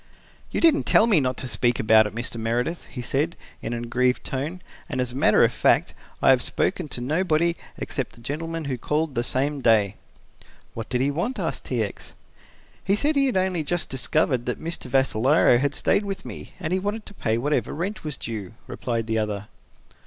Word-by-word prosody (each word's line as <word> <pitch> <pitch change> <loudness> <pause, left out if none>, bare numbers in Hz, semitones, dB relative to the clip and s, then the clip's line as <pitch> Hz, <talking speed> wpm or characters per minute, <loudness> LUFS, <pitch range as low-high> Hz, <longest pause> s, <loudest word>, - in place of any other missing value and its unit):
"You - - -2
didn't 325 -3 +4
tell 220 - +6
me 210 -8 +4
not 130 -2 -1
to 130 - -3
speak 120 +1 +1
about 110 0 +5
it, 105 - -9
Mr. 120 0 -4
Meredith," 120 +9 -2
he 125 - -7
said, 145 +7 0 0.3
in 115 - -4
an 120 0 -3
aggrieved 125 +2 +1
tone, 145 +7 -4 0.3
"and 130 - -3
as 125 -1 0
a - - -9
matter 135 - +5
of - - +4
fact - - +2 0.3
I - - +7
have 130 -2 +4
spoken 180 -4 0
to 125 - -2
nobody 165 +4 +1 0.2
except - - -4
the - - -16
gentleman 165 +5 -4
who 130 -3 -3
called 150 +3 -1
the 120 - 0
same 140 +3 -1
day." 105 -5 +3 0.8
"What 115 -1 -6
did 125 0 0
he 140 +2 +2
want?" 190 - -2
asked 175 -5 -3
T. 120 -4 0
X. 100 - -7 0.7
"He 195 - +2
said 295 +8 +1
he 275 -1 +4
had 250 - 0
only 185 -2 +1
just 175 +3 -2
discovered 130 -2 0
that 125 - -2
Mr. 165 +1 -3
Vassalaro 130 0 +4
had 145 +1 0
stayed 210 - +2
with 195 -1 -5
me - - -9
and 175 -2 -2
he 185 - +2
wanted 205 +3 -3
to - - -9
pay 110 - 0
whatever 145 +5 0
rent 190 +7 -4
was 150 -3 -4
due," 110 -3 -6
replied 115 -2 -3
the 110 0 0
other. 105 -1 -3
135 Hz, 205 wpm, -24 LUFS, 120-170 Hz, 0.8 s, I